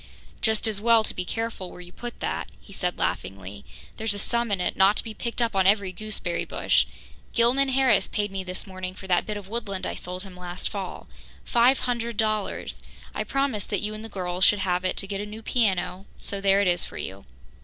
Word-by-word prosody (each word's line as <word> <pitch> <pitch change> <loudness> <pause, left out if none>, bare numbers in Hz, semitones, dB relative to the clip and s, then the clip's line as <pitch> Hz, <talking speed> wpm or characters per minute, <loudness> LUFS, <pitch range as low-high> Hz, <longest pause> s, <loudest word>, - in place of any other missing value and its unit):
"Just 220 0 +3
as 210 -2 0
well 230 0 +6
to - - 0
be 180 - -2
careful 225 -3 -3
where - - -11
you 175 0 -10
put 240 +5 -7
that," - - -2
he 200 - -14
said 180 -2 0
laughingly. 95 +1 -3 0.3
"There's 220 -2 0
a - - -4
sum 235 +3 0
in 200 - +1
it 180 - 0
not 195 +2 +5
to - - +2
be 225 - -6
picked 235 +2 -1
up 230 -3 -1
on 190 -1 +4
every 200 -2 +4
gooseberry 190 -3 -2
bush. - - +2 0.5
Gilman 250 +4 +4
Harris 260 -5 +4
paid 205 -1 -1
me 195 -1 -3
this 185 0 -4
morning 185 -1 -5
for 190 - -10
that 180 -2 +2
bit 210 -1 -2
of 200 -2 -8
woodland 200 -4 -3
I - - -2
sold 180 +1 -5
him 190 -2 -10
last 180 0 -4
fall 195 -3 -5 0.4
five 245 +3 +5
hundred 235 -2 -1
dollars. 215 -2 -1 0.3
I - - -1
promised 275 -7 0
that 205 - 0
you 210 0 -1
and 215 +1 -7
the 225 - -7
girls 180 -2 -1
should 210 - +7
have 180 -1 +1
it 185 - 0
to - - -1
get 200 0 -2
a - - -3
new 215 +2 -8
piano, 195 -5 +1
so 200 -1 -4
there 195 0 +5
it 200 - +3
is 175 -1 +2
for - - -7
you." 95 +1 -6
200 Hz, 230 wpm, -26 LUFS, 185-225 Hz, 0.5 s, should